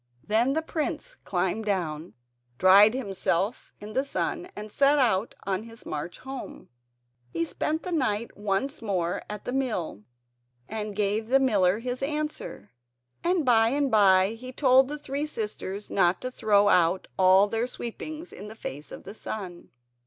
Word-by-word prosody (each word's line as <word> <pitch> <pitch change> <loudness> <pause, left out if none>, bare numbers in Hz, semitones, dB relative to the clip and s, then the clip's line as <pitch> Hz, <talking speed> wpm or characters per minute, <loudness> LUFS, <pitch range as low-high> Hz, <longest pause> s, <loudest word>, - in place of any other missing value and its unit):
Then 230 +5 +2
the 320 +2 0
prince 320 +10 -3
climbed 190 +4 -1
down, 170 -5 -2 0.4
dried 200 +5 +7
himself 200 -2 -1
in 210 +1 -9
the 265 - +1
sun, 360 +5 -3
and 210 0 -7
set 280 +4 +4
out 230 -6 +2
on 190 0 -1
his 230 0 -12
march 155 +3 -5
home. 265 0 -8 0.6
He 165 +6 -1
spent 305 - -2
the 365 - -5
night 235 -8 -1
once 205 +8 -2
more 180 -6 -1
at 210 -1 -7
the 245 - -3
mill 225 - -2 0.7
and 215 -1 -4
gave 210 +2 0
the 270 +3 +4
miller 205 -8 +3
his 250 +2 -4
answer, 300 +2 -4 0.5
and 345 -3 +1
by 225 -3 +5
and 280 +1 0
by 190 -3 +5
he 240 +3 -8
told 260 0 +4
the 295 +2 -4
three 290 +1 -3
sisters 210 -5 -5
not 180 -1 +3
to 255 - -4
throw 205 -4 +3
out 180 -1 +3
all 190 +2 +6
their 225 +3 -1
sweepings 310 +8 -6
in 205 - -9
the 215 - -9
face 145 -8 -7
of - - -9
the 200 - -8
sun. 190 -5 -7
220 Hz, 160 wpm, -27 LUFS, 195-265 Hz, 0.7 s, dried